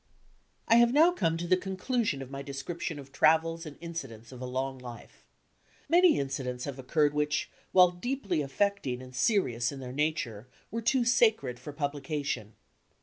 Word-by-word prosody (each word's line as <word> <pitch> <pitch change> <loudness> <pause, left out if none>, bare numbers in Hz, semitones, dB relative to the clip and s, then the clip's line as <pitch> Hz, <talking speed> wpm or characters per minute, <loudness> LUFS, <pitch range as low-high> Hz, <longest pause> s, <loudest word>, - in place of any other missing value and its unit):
I 230 - +6
have 235 0 +6
now 315 +6 +6
come 165 - 0
to 170 - -4
the 185 - +5
conclusion 190 - -2
of 130 - -12
my 135 0 -5
description 145 +4 -5
of 140 -1 -11
travels 165 +3 +2
and 145 - -10
incidents 135 -10 -7
of 130 -1 -10
a 125 - -4
long 130 +1 -3
life. 120 -2 -11 0.6
Many 350 0 +5
incidents 130 -2 -3
have 140 -2 -6
occurred 145 +3 +1
which, 150 0 -1 0.2
while 180 -1 +6
deeply 195 - -2
affecting 140 -2 -1
and 130 0 -12
serious 125 - +1
in 140 - -8
their 125 -1 -7
nature, 135 -7 -2 0.2
were 230 +2 -3
too 245 +2 +2
sacred 220 - +3
for 135 +4 -8
publi 145 0 -3
cation. 140 -7 -3
150 Hz, 170 wpm, -29 LUFS, 130-190 Hz, 0.6 s, I